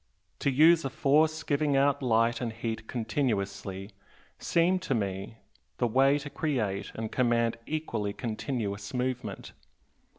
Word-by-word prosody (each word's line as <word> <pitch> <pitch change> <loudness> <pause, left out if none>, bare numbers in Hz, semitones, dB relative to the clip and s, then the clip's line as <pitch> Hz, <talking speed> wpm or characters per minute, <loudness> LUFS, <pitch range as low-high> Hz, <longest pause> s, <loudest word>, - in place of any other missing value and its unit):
To - - +1
use 160 +5 +5
a 135 - -1
force 155 +4 +2
giving 145 -1 +1
out 140 +1 +3
light 115 -1 +2
and 120 -2 -2
heat 110 -1 -5
continuously 100 -5 -2 0.5
seemed 180 +2 +2
to 185 - -1
me 100 +1 -3 0.4
the 125 - +1
way 135 +4 +4
to 145 0 -6
create 105 -10 -2
and 110 -1 -4
command 115 -2 +1
equally 120 -10 -2
continuous 110 -2 -4
movement. 125 -5 -3
120 Hz, 130 wpm, -29 LUFS, 110-140 Hz, 0.5 s, use